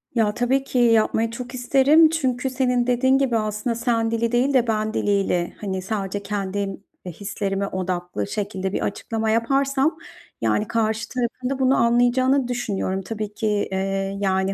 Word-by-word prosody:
Ya, 220 Hz, -3 st, +2 dB
tabii 255 Hz, +4 st, +1 dB
ki 265 Hz, -, -4 dB
yapmayı 225 Hz, -1 st, +3 dB
çok 245 Hz, +1 st, -7 dB
isterim. 275 Hz, +6 st, +5 dB
Çünkü 265 Hz, -5 st, -1 dB
senin 250 Hz, -2 st, +1 dB
dediğin 260 Hz, +2 st, +3 dB
gibi 265 Hz, -4 st, +1 dB
aslında 215 Hz, +2 st, -2 dB
sen 230 Hz, -1 st, 0 dB
dili 230 Hz, 0 st, 0 dB
değil 250 Hz, +3 st, +2 dB
de 250 Hz, -3 st, +3 dB
ben 215 Hz, -1 st, 0 dB
diliyle, 195 Hz, -4 st, 0 dB
hani, 190 Hz, -3 st, -3 dB
sadece 200 Hz, 0 st, -3 dB
kendim, 200 Hz, -1 st, -3 dB, 0.2 s
eee, 180 Hz, -, -5 dB
hislerime 200 Hz, +1 st, -3 dB
odaklı 180 Hz, -, -3 dB
şekilde 195 Hz, -2 st, -3 dB
bir -, -, -1 dB
açıklama 220 Hz, +2 st, -2 dB
yaparsam, 275 Hz, +6 st, +1 dB, 0.4 s
yani, 210 Hz, -, +1 dB
karşı 220 Hz, 0 st, -1 dB
tarafın 250 Hz, 0 st, -3 dB
da 275 Hz, 0 st, -3 dB
bunu 265 Hz, 0 st, +3 dB
anlayacağını 245 Hz, +3 st, +3 dB
düşünüyorum. 200 Hz, -6 st, -2 dB
Tabii 210 Hz, +2 st, -5 dB
ki, 220 Hz, -, -2 dB, 0.2 s
eee, 195 Hz, +1 st, -2 dB
yani, 190 Hz, -1 st, +1 dB
225 Hz, 155 wpm, -23 LUFS, 200-250 Hz, 0.4 s, isterim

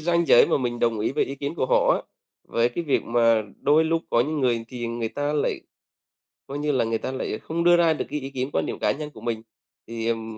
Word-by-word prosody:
ranh 170 Hz, +1 st, +1 dB
giới 120 Hz, -, +7 dB
mà -, -, +1 dB
mình 120 Hz, -2 st, -2 dB
đồng 115 Hz, -2 st, +1 dB
ý 110 Hz, -, 0 dB
với 150 Hz, -, +1 dB
ý 140 Hz, -, -6 dB
kiến 140 Hz, +3 st, -4 dB
của 130 Hz, -, -1 dB
họ -, -, +4 dB
á, -, -, -4 dB, 0.5 s
với 115 Hz, +1 st, +2 dB
cái 170 Hz, +8 st, -4 dB
việc 145 Hz, -, +1 dB
mà 115 Hz, -2 st, +3 dB, 0.2 s
đôi 155 Hz, +3 st, +4 dB
lúc 165 Hz, 0 st, 0 dB
có 115 Hz, -, +3 dB
những 150 Hz, +3 st, -1 dB
người 120 Hz, -3 st, +1 dB
thì 120 Hz, -2 st, -5 dB
người 115 Hz, -1 st, -3 dB
ta 145 Hz, +3 st, -2 dB
lại 150 Hz, -, 0 dB, 0.9 s
coi 140 Hz, +1 st, -5 dB
như 150 Hz, 0 st, 0 dB
là 130 Hz, -4 st, +1 dB
người 115 Hz, 0 st, 0 dB
ta 130 Hz, -, -4 dB
lại 130 Hz, -4 st, -3 dB
không 170 Hz, +1 st, -3 dB
đưa 175 Hz, 0 st, +6 dB
ra 165 Hz, -2 st, +4 dB
được -, -, -3 dB
cái 150 Hz, +1 st, -2 dB
ý 135 Hz, 0 st, -6 dB
kiến, 130 Hz, 0 st, -3 dB
quan -, -, +1 dB
điểm -, -, -5 dB
cá -, -, +2 dB
nhân 150 Hz, +1 st, -5 dB
của -, -, -14 dB
mình 115 Hz, -2 st, -3 dB, 0.5 s
thì, 115 Hz, 0 st, -4 dB
ờm, 115 Hz, -1 st, -3 dB
130 Hz, 265 wpm, -24 LUFS, 115-150 Hz, 0.9 s, giới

